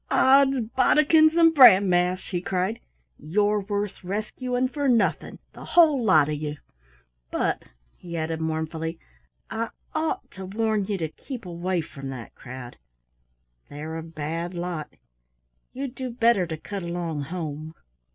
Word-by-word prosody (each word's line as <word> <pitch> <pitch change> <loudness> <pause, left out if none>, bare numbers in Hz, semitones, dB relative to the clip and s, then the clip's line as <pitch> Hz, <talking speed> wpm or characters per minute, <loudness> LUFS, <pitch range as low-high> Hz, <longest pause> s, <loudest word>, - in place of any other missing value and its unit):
"Ods 270 -1 +5
bodikins 310 +3 +5
and 330 -1 +6
bran 225 -9 +8
mash!" 180 +1 +1
he 175 -2 -1
cried. 185 +4 -1 0.4
"You're 205 +5 +1
worth 200 -1 -3
rescuing 245 +6 -2
for 285 +2 -2
nothing, 235 -2 +1 0.2
the - - -11
whole 310 -7 +4
lot 155 -9 +5
of 155 - -2
you! 150 0 -4 0.7
But" - - -1 0.4
he 170 -1 -7
added 160 0 -2
mournfully 160 +1 -3 0.5
"I 230 0 -2 0.2
ought 315 0 -2
to 190 -1 -8
warn 215 0 0
you 205 0 -2
to 165 -3 -2
keep 245 - -9
away 175 0 -2
from 135 -3 -8
that 125 -4 -8
crowd 125 -1 -10 0.9
they're 155 +2 -6
a 165 - -4
bad 165 +2 -5
lot. 170 -3 -4 0.8
You'd 265 -1 -5
do 260 -1 -5
better 230 -6 +2
to 160 -1 -4
cut 200 +5 -6
along 170 -3 -3
home." 155 -1 -6
185 Hz, 140 wpm, -25 LUFS, 160-235 Hz, 0.9 s, bran